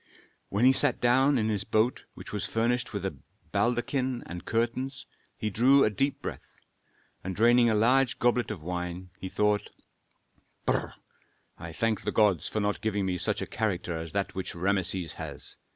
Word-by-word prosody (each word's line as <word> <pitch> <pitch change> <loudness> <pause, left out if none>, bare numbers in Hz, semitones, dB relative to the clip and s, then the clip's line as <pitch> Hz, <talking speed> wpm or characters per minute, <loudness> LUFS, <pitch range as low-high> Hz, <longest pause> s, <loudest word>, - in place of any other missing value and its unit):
When 105 +5 +2
he 130 - +7
sat 140 -1 +2
down 130 +3 +4
in 110 -2 +1
his 105 -2 0
boat, 110 +5 +1
which - - -10
was - - -2
furnished 120 +2 0
with 100 -2 -4
a 95 - -3 0.4
baldachin 125 +1 0
and 85 0 -8
curtains, 130 +4 -1 0.3
he 105 - -2
drew 130 +7 +5
a 105 - +2
deep 135 +7 -1
breath - - -5 0.8
and 95 0 -4
draining 120 +3 +5
a 110 - +2
large 125 +3 +3
goblet 120 -2 +1
of 95 -8 -6
wine, 90 +1 -4 0.2
thought, 105 +1 +1 1.0
"Brr! - - 0 0.6
I 85 - -7
thank 110 +5 0
the - - -2
gods 105 -8 +3
for 110 - -2
not 105 0 -1
giving 105 -3 0
me 90 -1 -1
such - - 0
a - - -3
character 95 -6 -2
as 80 0 -5
that 100 -1 -1
which 95 -2 -5
Rameses 95 -1 0
has. - - -7
110 Hz, 170 wpm, -28 LUFS, 95-120 Hz, 1.0 s, he